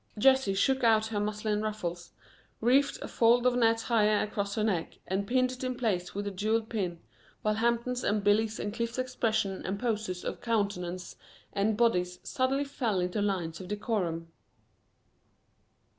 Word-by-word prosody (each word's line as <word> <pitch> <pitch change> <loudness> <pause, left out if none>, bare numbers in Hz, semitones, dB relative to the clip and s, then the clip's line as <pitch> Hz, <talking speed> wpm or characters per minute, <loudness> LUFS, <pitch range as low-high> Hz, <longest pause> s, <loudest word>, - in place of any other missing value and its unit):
Jessie 265 -3 +4
shook 265 +6 +2
out 220 -2 +5
her 220 -2 -2
muslin 210 0 -1
ruffles, 180 -5 -4 0.5
reefed 265 +5 +3
a - - -4
fold 235 +1 +3
of 250 -1 +4
net 230 -2 +3
higher 215 -3 +3
across 200 -1 -3
her 215 - 0
neck, 190 -7 -1
and 195 +2 -2
pinned 255 +1 +2
it 255 0 -7
in 255 0 -1
place 195 -8 -1
with 205 0 -2
a 205 - -2
jeweled 220 +4 0
pin, 180 -7 -2 0.4
while 215 - +2
Hampton's 235 +2 0
and 210 0 +1
Billy's 215 +2 +2
and 205 - -3
Cliff's 235 +1 -3
expressions 220 -6 -1
and 195 +2 -3
poses 210 -6 -2
of - - -4
countenance 190 -6 -2 0.4
and 210 +2 +1
bodies 180 -6 +2
suddenly 265 +2 0
fell 240 -8 -1
into 180 +3 -1
lines 185 -4 -1
of 185 - -8
decorum. 185 -6 -2
215 Hz, 160 wpm, -30 LUFS, 195-235 Hz, 0.5 s, out